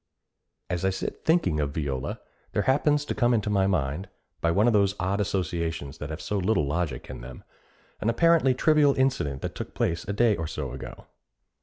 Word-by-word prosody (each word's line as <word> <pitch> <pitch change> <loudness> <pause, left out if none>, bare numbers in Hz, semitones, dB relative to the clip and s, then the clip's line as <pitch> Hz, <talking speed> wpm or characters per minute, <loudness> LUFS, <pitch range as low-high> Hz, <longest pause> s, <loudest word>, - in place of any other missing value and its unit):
As 90 0 -2
I 95 - +3
sit 95 - -4
thinking 160 - +2
of 70 -1 -2
Viola, 70 -4 -3 0.3
there - - +1
happens 145 +2 +2
to - - -2
come 120 0 +3
into 105 -1 0
my 95 -2 +3
mind, 90 0 -1 0.3
by 85 - +2
one 100 +6 +3
of 120 - +4
those 100 -1 +3
odd 95 +3 0
associations 85 -7 -2
that 75 - -5
have 80 +1 -5
so 105 - -2
little 95 -3 +2
logic 75 -3 -2
in 65 - -8
them, 65 +1 -10 0.6
an 110 - 0
apparently 145 +1 +4
trivial 150 0 +4
incident 100 - 0
that - - -3
took - - -7
place 85 0 0
a 100 - -1
day 110 0 +3
or 80 -2 -3
so 75 -5 -4
ago. 65 0 -9
95 Hz, 195 wpm, -26 LUFS, 75-115 Hz, 0.6 s, of